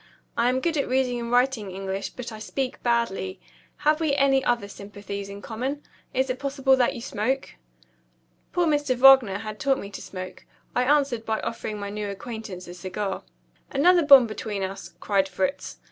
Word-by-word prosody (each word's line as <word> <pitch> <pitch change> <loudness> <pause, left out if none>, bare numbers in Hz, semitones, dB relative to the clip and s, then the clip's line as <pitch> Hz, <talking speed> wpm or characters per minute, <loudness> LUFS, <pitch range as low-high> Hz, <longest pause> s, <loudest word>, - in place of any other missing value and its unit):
"I 235 +1 +3
am 260 +1 0
good 330 0 0
at 280 - 0
reading 255 -1 +1
and 235 0 -4
writing 245 -4 +2
English, 195 +1 -4
but 245 -2 -7
I 220 - -8
speak 260 +3 -3
badly. 235 - 0 0.5
Have 305 +1 +4
we 300 -3 +2
any 270 -1 +3
other 235 -4 +1
sympathies 200 0 -7
in 200 0 -9
common? 260 +6 -4 0.3
Is 260 +1 +1
it 255 - -5
possible 270 -1 +2
that 245 -2 +2
you - - -6
smoke?" 250 +5 -2 1.0
Poor 355 -1 +2
Mr. 290 -4 +1
Wagner 255 -6 +7
had 215 0 -7
taught 275 -2 +2
me 200 - -7
to - - -7
smoke. 185 -1 -8 0.3
I 250 - +2
answered 275 -5 +2
by 220 -1 -1
offering 225 -2 -4
my 200 0 -5
new 210 0 -4
acquaintance 200 -3 -7
a 175 - -8
cigar. 190 +2 -4 0.5
"Another 345 +6 +4
bond 275 -4 +8
between 210 -2 -4
us," 190 -3 -6
cried 195 -2 +1
Fritz. 280 +10 -2
235 Hz, 180 wpm, -25 LUFS, 200-270 Hz, 1.0 s, bond